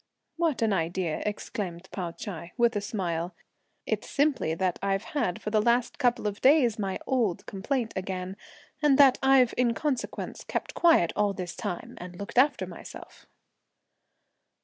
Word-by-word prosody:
"What 325 Hz, -8 st, +1 dB
an 220 Hz, -2 st, +2 dB
idea!" 170 Hz, -1 st, -1 dB
exclaimed 190 Hz, -3 st, -4 dB
Pao 180 Hz, -3 st, -3 dB
Ch'ai, 170 Hz, -1 st, -8 dB
with 235 Hz, -2 st, +3 dB
a 205 Hz, -, 0 dB
smile. 175 Hz, -4 st, -3 dB, 0.5 s
"It's -, -, -2 dB
simply 280 Hz, -, +1 dB
that 185 Hz, 0 st, -1 dB
I've 195 Hz, +1 st, 0 dB
had 235 Hz, -12 st, -2 dB
for 210 Hz, -, -3 dB
the 215 Hz, -1 st, +3 dB
last 240 Hz, +2 st, +1 dB
couple 245 Hz, -3 st, +2 dB
of 205 Hz, -1 st, -2 dB
days 260 Hz, -6 st, +5 dB
my 195 Hz, -2 st, -1 dB
old 235 Hz, -10 st, 0 dB
complaint 225 Hz, +4 st, -2 dB
again, 185 Hz, 0 st, -4 dB, 0.5 s
and 290 Hz, -3 st, +5 dB
that 275 Hz, -3 st, +6 dB
I've 265 Hz, -2 st, +5 dB
in 240 Hz, -2 st, +2 dB
consequence 285 Hz, -5 st, -3 dB
kept -, -, -4 dB
quiet 325 Hz, -, +4 dB
all 205 Hz, -1 st, +2 dB
this 180 Hz, -2 st, -5 dB
time, 200 Hz, -5 st, -5 dB
and 180 Hz, 0 st, -8 dB
looked 200 Hz, +6 st, -1 dB
after 285 Hz, +3 st, +3 dB
myself." -, -, -11 dB
210 Hz, 155 wpm, -28 LUFS, 185-250 Hz, 0.5 s, that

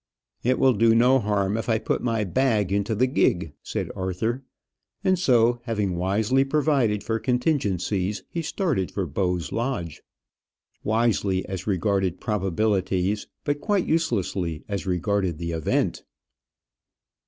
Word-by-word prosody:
"It 125 Hz, +2 st, +2 dB
will 130 Hz, -1 st, +4 dB
do 115 Hz, +1 st, +4 dB
no 125 Hz, +3 st, +5 dB
harm 105 Hz, -2 st, 0 dB
if 115 Hz, -, -4 dB
I 110 Hz, -, +3 dB
put -, -, -1 dB
my 115 Hz, -3 st, 0 dB
bag 105 Hz, -2 st, +1 dB
into 100 Hz, +3 st, 0 dB
the 125 Hz, +5 st, +3 dB
gig," 90 Hz, -, +1 dB
said -, -, -4 dB
Arthur; 105 Hz, +8 st, -2 dB, 0.6 s
and 185 Hz, -1 st, +2 dB
so, 120 Hz, -6 st, +3 dB
having 105 Hz, -6 st, -1 dB
wisely 105 Hz, +9 st, +2 dB
provided 135 Hz, -7 st, +1 dB
for 115 Hz, +1 st, -1 dB
contingencies, 105 Hz, -, 0 dB
he 170 Hz, -, -3 dB
started 155 Hz, -, -1 dB
for 100 Hz, -, -2 dB
Bowes 90 Hz, +2 st, -1 dB
Lodge. 115 Hz, -, -3 dB, 0.8 s
Wisely, 110 Hz, -4 st, +1 dB
as 95 Hz, +1 st, -6 dB
regarded 95 Hz, -1 st, 0 dB
probabilities, 100 Hz, -1 st, 0 dB, 0.2 s
but 145 Hz, 0 st, -1 dB
quite 205 Hz, -4 st, +1 dB
uselessly 95 Hz, -, -1 dB
as 100 Hz, -1 st, -4 dB
regarded 95 Hz, -1 st, 0 dB
the 85 Hz, +1 st, -4 dB
event! 80 Hz, -2 st, 0 dB
105 Hz, 130 wpm, -25 LUFS, 95-125 Hz, 0.8 s, no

